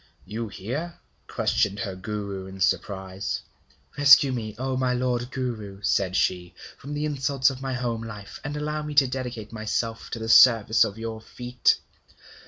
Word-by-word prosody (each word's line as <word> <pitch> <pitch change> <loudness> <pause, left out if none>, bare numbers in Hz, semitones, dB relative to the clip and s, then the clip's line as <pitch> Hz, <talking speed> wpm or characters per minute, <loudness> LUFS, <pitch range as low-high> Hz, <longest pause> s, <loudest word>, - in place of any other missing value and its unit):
'You 110 +4 -4
here?' 140 - -5 0.3
questioned 100 0 0
her 95 -4 -4
Guru 100 -1 -5
in 95 0 -10
surprise. 95 0 -1 0.6
'Rescue 140 -2 +7
me, 110 -4 -4
O 130 +1 -2
my 130 -1 +1
lord 125 -1 -1
Guru,' 115 -7 -4
said 95 -1 +1
she, 90 -1 0 0.2
'from 145 +2 -6
the 150 +1 -1
insults 140 -2 +1
of 130 0 -9
my 135 -1 -3
home 120 -3 -2
life, 105 -3 -8
and 145 +1 -4
allow 150 +1 -2
me 150 0 -6
to 140 -1 +7
dedicate 125 -4 -5
myself 115 +1 -3
to - - -4
the 110 0 -5
service 115 -2 +7
of 100 - -3
your 115 -1 -5
feet.' 125 +2 +1
115 Hz, 165 wpm, -25 LUFS, 100-130 Hz, 0.6 s, Rescue